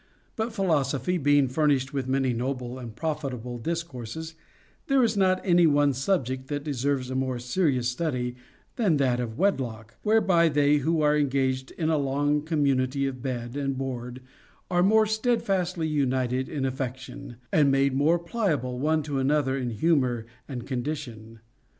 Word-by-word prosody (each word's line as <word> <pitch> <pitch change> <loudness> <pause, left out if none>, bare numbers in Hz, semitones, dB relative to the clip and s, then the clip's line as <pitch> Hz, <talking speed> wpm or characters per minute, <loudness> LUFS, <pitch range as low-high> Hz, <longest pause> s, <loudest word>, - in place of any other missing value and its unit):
But 225 +1 -2
philosophy 175 - 0
being 145 -1 +4
furnished 140 0 +1
with 135 -2 -2
many 130 -1 +1
noble 125 +1 -3
and 115 -3 -8
profitable 130 -5 -4
discourses, 160 0 -5 0.5
there 275 -2 +4
is 225 -2 +1
not 185 -2 +3
any 175 -2 +5
one 145 -1 +3
subject 130 -3 -1
that 145 0 -3
deserves 140 -2 -1
a - - -3
more 130 -1 -1
serious 125 0 0
study 125 -3 -2 0.4
than 200 - +2
that 130 -3 +1
of 115 -2 -4
wedlock, 120 - -1
whereby 195 -6 +3
they 145 0 +3
who 155 +3 +1
are 150 0 +4
engaged 130 -2 0
in 160 -2 0
a 155 - +2
long 145 +2 +1
community 140 -3 +1
of 130 -2 -4
bed 120 -1 -4
and 135 -2 -2
board 125 -1 -5 0.5
are 175 0 +3
more 215 +4 +5
steadfastly 195 -7 0
united 130 -3 0
in 140 -3 -2
affection, 130 0 -5 0.2
and 150 -3 +5
made 135 0 +2
more 150 +6 +3
pliable 165 - -2
one 155 +2 +1
to 145 -2 -2
another 135 0 +1
in 130 -3 -2
humor 125 -2 +1 0.2
and 125 -4 -6
condition. 120 -5 -5
140 Hz, 155 wpm, -26 LUFS, 130-160 Hz, 0.5 s, any